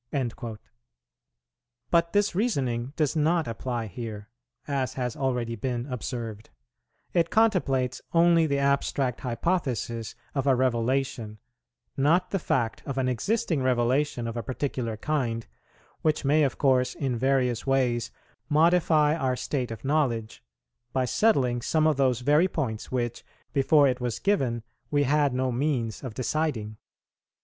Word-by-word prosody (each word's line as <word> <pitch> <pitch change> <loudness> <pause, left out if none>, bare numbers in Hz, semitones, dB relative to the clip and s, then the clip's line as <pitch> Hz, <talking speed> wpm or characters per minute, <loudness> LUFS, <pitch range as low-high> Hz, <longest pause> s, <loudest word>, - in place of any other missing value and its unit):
"[84:1] 120 -4 -3 1.3
But 170 0 +3
this 205 0 +2
reasoning 135 - -1
does 155 -1 0
not 160 +1 +2
apply 115 0 -3
here, 105 0 -7 0.4
as 135 -3 -1
has 125 -3 -2
already 125 -4 -1
been 120 +1 -3
observed; 115 -3 -5 0.6
it 170 -2 +2
contemplates 135 - +2
only 170 -1 +4
the 140 -1 0
abstract 140 -2 +1
hypothesis 120 - -2 0.2
of 135 -1 -1
a 135 - +5
revelation, 125 -2 0 0.6
not 165 +7 +2
the 195 - 0
fact 120 -8 -1
of 135 -1 -3
an 130 -1 +1
existing 160 - 0
revelation 130 +1 +1
of 115 - -4
a 120 - -2
particular 120 -1 -3
kind, 120 -4 -1 0.6
which 155 -2 +1
may 150 +3 +4
of 140 -4 +1
course 130 -2 +2
in 130 -3 -1
various 125 -1 +1
ways 125 -3 +1 0.4
modify 155 -1 +4
our 130 -5 0
state 125 -1 -2
of 115 +3 -8
knowledge, 130 -7 0 0.5
by 130 -1 +1
settling 125 - +2
some 155 +5 +1
of 155 -3 +3
those 130 -3 +2
very 150 +7 +4
points 130 -11 -3
which, 120 -2 -2 0.3
before 145 +1 +5
it 125 -1 -1
was 120 -2 -2
given, 130 - 0 0.3
we 145 -1 +2
had 145 +1 +2
no 130 0 0
means 125 -3 -1
of 125 -5 -6
deciding. 125 -5 -2
130 Hz, 140 wpm, -27 LUFS, 120-150 Hz, 1.3 s, a